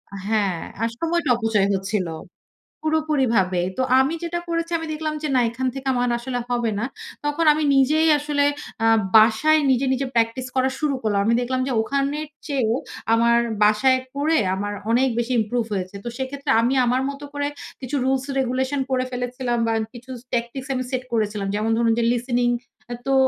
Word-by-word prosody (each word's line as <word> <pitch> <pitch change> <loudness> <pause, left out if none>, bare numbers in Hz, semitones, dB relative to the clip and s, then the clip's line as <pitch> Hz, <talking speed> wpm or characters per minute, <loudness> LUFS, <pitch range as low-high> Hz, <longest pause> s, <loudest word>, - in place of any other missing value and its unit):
আ - - -5
হ্যাঁ, 205 -5 +1 0.3
আর 230 - +1
সময়টা 335 -2 0
অপচয় 220 -4 +1
হচ্ছিলো, 190 -3 -2 0.7
পুরোপুরি 310 -3 +1
ভাবেই। 185 -2 +1
তো - - +1 0.2
আমি 270 +4 +2
যেটা 345 0 -2
করেছি 335 0 -2
আমি 325 0 -6
দেখলাম 310 0 -3
যে - - 0
না - - +5
এখান 255 +3 -3
থেকে 270 0 -6
আমার 245 0 +1
আসলে 245 +1 -3
হবে 240 -2 0
না। 225 - -1 0.4
তখন 295 +3 0
আমি 305 +1 -1
নিজেই 305 +4 +4
আসলে 290 -1 +1 0.4
আ - - +4 0.3
বাসায় 225 +9 +5
নিজে, 260 +1 +2
নিজে 265 +1 -1
প্র্যাকটিস 230 +2 +1
করা 260 0 +2
শুরু 300 -3 0
করলাম। 205 -2 +1
আমি 230 - +3
দেখলাম 255 +1 -1
যে - - -2
ওখানের 280 +5 -1 0.2
চেয়েও 250 -6 +1 0.4
আমার 235 +1 +4 0.3
বাসায় 235 +5 +4 0.2
পড়ে 310 +3 +2 0.2
আমার 205 +2 -3 0.2
অনেক 260 +3 +3
বেশি 240 +2 -2
ইমপ্রুভ 230 +2 0
হয়েছে। 185 0 -4
তো 240 - -4
সেইক্ষেত্রে 275 +2 -3
আমি 240 +3 +1
আমার 250 +2 +1
মতো 280 +1 -7
করে 285 0 -1 0.3
কিছু 260 +2 -4
রুলস 265 0 +1
রেগুলেশন 260 +2 0
করে 255 0 +1
ফেলেছিলাম 245 0 -2
বা 225 - +1 0.2
কিছু 250 +1 -9
ট্যাকটিক্স 240 +3 -2
আমি 255 -1 -1
সেট 255 -1 -1
করেছিলাম। 210 -3 -1
যেমন 215 +2 0
ধরুন 230 -1 +3
যে - - +1
listening. 245 0 +1 0.5
তো 270 - +2
255 Hz, 180 wpm, -22 LUFS, 230-280 Hz, 0.7 s, না